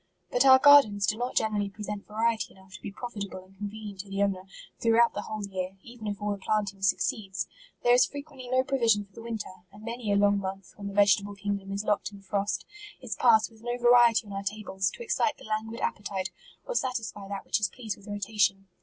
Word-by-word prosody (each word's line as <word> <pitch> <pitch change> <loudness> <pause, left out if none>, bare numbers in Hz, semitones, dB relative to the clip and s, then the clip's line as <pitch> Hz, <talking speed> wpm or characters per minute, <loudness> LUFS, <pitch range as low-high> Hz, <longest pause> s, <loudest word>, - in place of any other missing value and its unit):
" - - -44
But 245 +2 +3
our 260 0 +10
gardens 260 -8 +7
do 210 - +1
not 245 +3 -3
generally 210 -2 +1
pre 210 +2 -9
sent 210 0 -5
variety 225 +1 -1
enough 190 0 -18
to 190 - -10
be 205 - -6
profitable 200 -4 -6
and 190 +1 -22
con 205 0 -3
venient 210 -2 -8
to 195 +1 -7
the 195 +1 0
owner, 190 -2 -1 0.3
throughout 230 +1 +4
the 205 - -3
whole 215 0 -5
year, 190 -1 -5
even 235 -2 -9
if 205 -1 -3
all 210 0 -1
the 200 - -3
planting 200 -1 -1
succeeds. 195 -1 0 0.4
There 240 - +4
MARCH* 245 - +7
SI - - +7
is - - -20
frequently 280 -3 -8
no 255 +1 +3
provision 230 -6 +2
for 200 - -31
the 230 - -10
winter, 225 -4 -5 0.2
and 205 +2 -14
many 230 -2 -3
a - - +3
long 200 0 +4
month, 195 0 -6
when 200 -1 -7
the 200 - -6
vegetable 205 0 +4
king 200 +1 -2
dom 195 0 -10
is 200 +1 -2
locked 210 0 0
in 200 -1 -13
frost, 200 +1 -1 0.3
is 250 -4 -5
passed 225 -2 +4
with 220 -1 -19
no 240 +1 -2
va 240 0 +3
riety 235 -2 +6
on 200 - -9
our 195 - -3
tables, 195 -1 -2
to - - -9
excite 300 -9 +1
the - - -15
languid 220 +1 -3
ap - - 0
petite, 195 -2 -4 0.3
or - - -3
satisfy 225 - -2
that 200 -1 -5
which - - +1
is 210 - +1
pleased 225 -5 -5
with 200 - -18
rotation. 205 -1 0
210 Hz, 245 wpm, -28 LUFS, 200-230 Hz, 0.4 s, our